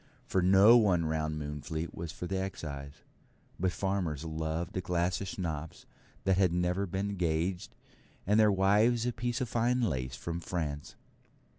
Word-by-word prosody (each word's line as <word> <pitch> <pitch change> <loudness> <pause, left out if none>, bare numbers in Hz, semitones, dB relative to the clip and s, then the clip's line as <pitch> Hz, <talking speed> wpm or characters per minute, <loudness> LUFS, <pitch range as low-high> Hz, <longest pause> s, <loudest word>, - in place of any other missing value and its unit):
For 95 - +1
no 95 +6 +7
one 95 -7 +3
round 80 -1 -1
Moonfleet 75 +2 -4
was 85 -1 -5
for 90 - -7
the 95 +1 -2
Excise; 70 -7 -6 0.6
but 90 +1 +1
farmers 90 -6 -2
loved 80 +3 -3
a 95 - 0
glass 90 +2 0
of 100 - -4
Schnapps 80 -5 -5 0.4
that 95 -1 +2
had 95 -3 +4
never 90 +3 0
been 100 +3 -3
gauged, 85 +1 -1 0.5
and 105 +3 +3
their 105 -1 +6
wives 105 +5 +3
a 125 - 0
piece 120 +2 -2
of 125 - -2
fine 120 +3 +1
lace 65 - -1
from 85 0 -4
France. 75 -5 -4
90 Hz, 160 wpm, -31 LUFS, 80-100 Hz, 0.6 s, no